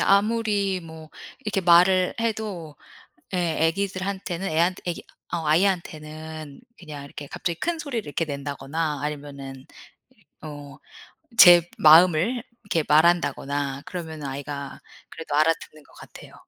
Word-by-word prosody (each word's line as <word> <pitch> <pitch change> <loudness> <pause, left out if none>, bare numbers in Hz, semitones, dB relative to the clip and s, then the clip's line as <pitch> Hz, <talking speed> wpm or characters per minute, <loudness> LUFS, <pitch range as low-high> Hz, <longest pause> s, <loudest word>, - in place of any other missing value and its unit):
아무리 205 -2 +2
뭐 160 -2 -12 0.3
이렇게 215 -6 -2
말을 180 +1 +5
해도 210 -9 -3 0.6
예 175 -3 0
애기들한테는 190 0 -3
애한테 170 +4 +1
애기 175 - -3 0.3
어 165 -2 -2
아이한테는 155 -3 -2 0.2
그냥 150 -5 -9
이렇게 145 +1 -9
갑자기 170 +4 -4
큰 340 -1 -1
소리를 270 -8 -4
이렇게 155 +3 -2
낸다거나 145 +1 -4
아니면은 140 -3 -7 0.5
이 - - -30 0.2
어 145 -3 -9 0.6
제 175 -1 +10 0.2
마음을 175 +9 +5 0.2
이렇게 165 -6 0
말한다거나 145 -3 +2
그러면은 160 -5 -6
아이가 140 +1 -6 0.3
그래도 160 -3 -7
알아듣는 155 0 0
것 - - -23
같아요. - - -13
165 Hz, 305 characters per minute, -24 LUFS, 150-185 Hz, 0.6 s, 제